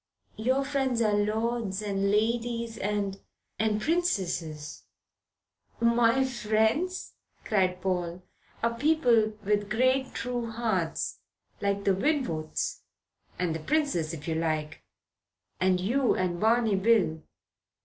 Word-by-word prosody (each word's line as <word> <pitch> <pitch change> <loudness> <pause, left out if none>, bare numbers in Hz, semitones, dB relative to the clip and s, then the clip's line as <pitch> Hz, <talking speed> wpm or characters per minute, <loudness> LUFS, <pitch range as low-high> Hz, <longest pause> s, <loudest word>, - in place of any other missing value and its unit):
Your 260 +5 +1
friends 270 -4 0
are 215 -1 +2
lords 215 0 0
and 200 -1 0
ladies 230 +2 0
and 200 -1 -2 0.4
and 215 0 +1
princesses 190 - -1 0.5
" - - -41 0.2
"My 240 +3 +4
friends," 240 - 0 0.3
cried 185 -3 +1
Paul, 180 -1 -2 0.4
"are 230 0 +2
people 240 -5 +3
with 205 0 +1
great 255 +4 +1
true 245 -2 -3
hearts 220 -8 -1 0.4
like 200 0 0
the 195 - +3
Winwoods 195 - -1 0.6
and 180 -3 0
the 160 - -3
princess, 180 - 0
if 155 -2 -8
you 165 - 0
like 155 -1 -2 0.8
and 185 0 +3
you, 245 +8 +2
and 175 -2 -1
Barney 225 -1 +3
Bill." 190 -7 +2
215 Hz, 115 wpm, -28 LUFS, 185-240 Hz, 0.8 s, My